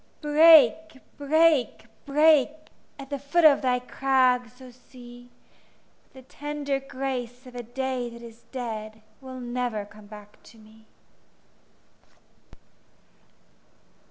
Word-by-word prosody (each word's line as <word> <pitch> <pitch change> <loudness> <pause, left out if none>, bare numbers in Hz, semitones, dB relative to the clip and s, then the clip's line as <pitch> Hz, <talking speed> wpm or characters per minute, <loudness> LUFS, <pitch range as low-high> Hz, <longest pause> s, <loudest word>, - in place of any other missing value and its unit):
Break, 315 -1 +5 0.2
break, 300 -5 +1 0.2
break, 300 -1 +4 0.5
At 275 0 -11
the 280 - -3
foot 290 +5 +1
of 295 -2 +6
thy 250 -1 +1
crags, 250 -1 0
O 255 -1 -13
Sea! 245 0 -16 0.8
But - - -36
the 260 - -13 0.2
tender 290 -1 -3
grace 260 -2 -6
of 250 - -13
a 245 - -6
day 250 +1 -4
that 235 0 -13
is 230 0 -13
dead 220 -4 -7 0.2
Will 260 -1 -9
never 240 -3 -4
come 210 0 -17
back 210 0 -15
to 230 - -19
me. 220 0 -20
255 Hz, 115 wpm, -25 LUFS, 240-280 Hz, 0.8 s, of